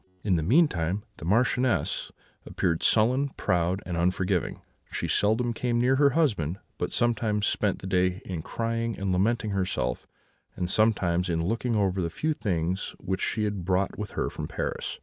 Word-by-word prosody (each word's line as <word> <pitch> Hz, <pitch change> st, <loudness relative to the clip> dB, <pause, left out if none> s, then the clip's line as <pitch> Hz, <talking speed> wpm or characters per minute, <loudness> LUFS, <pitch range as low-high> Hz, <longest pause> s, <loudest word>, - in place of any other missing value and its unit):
"In 100 Hz, -4 st, +2 dB
the 80 Hz, -, +1 dB
meantime, 100 Hz, -, +2 dB
the -, -, -8 dB
Marchioness 125 Hz, +5 st, +1 dB, 0.3 s
appeared 85 Hz, -2 st, -1 dB
sullen, 130 Hz, +6 st, +3 dB
proud, 90 Hz, +2 st, 0 dB
and 90 Hz, -, -3 dB
unforgiving: 90 Hz, +1 st, 0 dB, 0.3 s
she -, -, -2 dB
seldom 115 Hz, +3 st, +2 dB
came 120 Hz, 0 st, 0 dB
near 130 Hz, +2 st, +3 dB
her 140 Hz, 0 st, +5 dB
husband, 100 Hz, -, +1 dB, 0.2 s
but -, -, -2 dB
sometimes 110 Hz, -3 st, +1 dB
spent 105 Hz, -3 st, +1 dB
the -, -, -5 dB
day 90 Hz, -1 st, +1 dB
in 90 Hz, -4 st, -4 dB
crying 115 Hz, +4 st, -2 dB
and 100 Hz, -1 st, -1 dB
lamenting 110 Hz, +4 st, +1 dB
herself, 95 Hz, -9 st, -1 dB, 0.5 s
and 90 Hz, -1 st, -2 dB
sometimes 90 Hz, -5 st, +2 dB
in 80 Hz, -1 st, 0 dB
looking 115 Hz, +4 st, 0 dB
over 95 Hz, -3 st, +1 dB
the 85 Hz, -, -1 dB
few 155 Hz, -, -1 dB
things 90 Hz, -, -2 dB
which 95 Hz, +1 st, -3 dB
she 110 Hz, -, 0 dB
had 105 Hz, -3 st, -2 dB
brought 95 Hz, +3 st, 0 dB
with 105 Hz, -1 st, -5 dB
her -, -, +1 dB
from -, -, -5 dB
Paris. -, -, -3 dB
100 Hz, 170 wpm, -27 LUFS, 90-115 Hz, 0.5 s, her